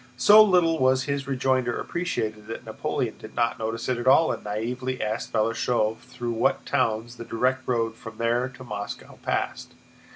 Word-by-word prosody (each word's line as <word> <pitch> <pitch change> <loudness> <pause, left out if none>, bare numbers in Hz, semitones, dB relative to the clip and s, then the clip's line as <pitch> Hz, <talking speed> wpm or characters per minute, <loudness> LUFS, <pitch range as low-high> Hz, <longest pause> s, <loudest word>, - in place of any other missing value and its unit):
So 210 +10 +8
little 175 -5 +3
was 130 0 +3
his 140 0 -3
rejoinder 130 -2 +1
appreciated 110 -12 -3
that 115 - -7
Napoleon - - -3
did - - -11
not 115 -2 +1
notice 115 +1 -3
it 125 -2 0
at 120 - -4
all 160 +5 +6
and - - -5
naïvely 125 +5 -3
asked 110 +1 -3
Balashëv 110 0 +1
through 125 -1 -6
what 115 0 +1
towns 120 -1 0
the - - -6
direct 130 +3 -1
road 115 -2 0
from 115 -1 -11
there 120 +2 +1
to 130 0 -12
Moscow 105 -4 -7
passed. - - -3
120 Hz, 170 wpm, -25 LUFS, 115-130 Hz, -, So